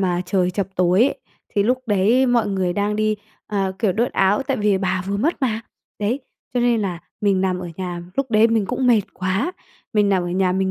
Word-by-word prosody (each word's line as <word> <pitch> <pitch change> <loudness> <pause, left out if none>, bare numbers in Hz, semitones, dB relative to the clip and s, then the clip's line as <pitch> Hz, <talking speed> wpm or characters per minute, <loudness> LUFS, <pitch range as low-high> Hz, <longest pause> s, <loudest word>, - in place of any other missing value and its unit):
mà 180 -2 0
trời 180 -1 +1
chập 195 0 -2
tối 180 +3 +4
ấy, 270 - +1 0.3
thì 205 - +1
lúc 250 +4 +2
đấy 220 +6 +3
mọi 240 -3 +2
người 190 -2 0
đang 205 +2 -1
đi, 215 0 +1 0.3
ờ, 195 -2 -1
kiểu, 195 -3 +2
đốt 235 +6 0
áo 195 +6 +2
tại 270 -1 -1
vì 205 -2 +2
bà 190 -1 -1
vừa 200 - 0
mất 290 +7 -1
mà, 225 -3 +1 0.4
đấy, 225 +7 -1 0.3
cho 245 - +2
nên 240 -2 +3
là 180 -4 -3 0.2
mình 200 -2 +2
nằm 185 -1 0
ở 180 -1 -6
nhà, 180 -2 -4
lúc 270 +1 -1
đấy 220 +1 +5
mình 225 -3 +1
cũng 260 +6 -1
mệt 235 -3 +5
quá, 190 - -1 0.4
mình 210 -2 +3
nằm 190 -2 +2
ở 175 - -3
nhà 185 +1 +1
mình 190 0 0
200 Hz, 230 wpm, -21 LUFS, 185-225 Hz, 0.4 s, đấy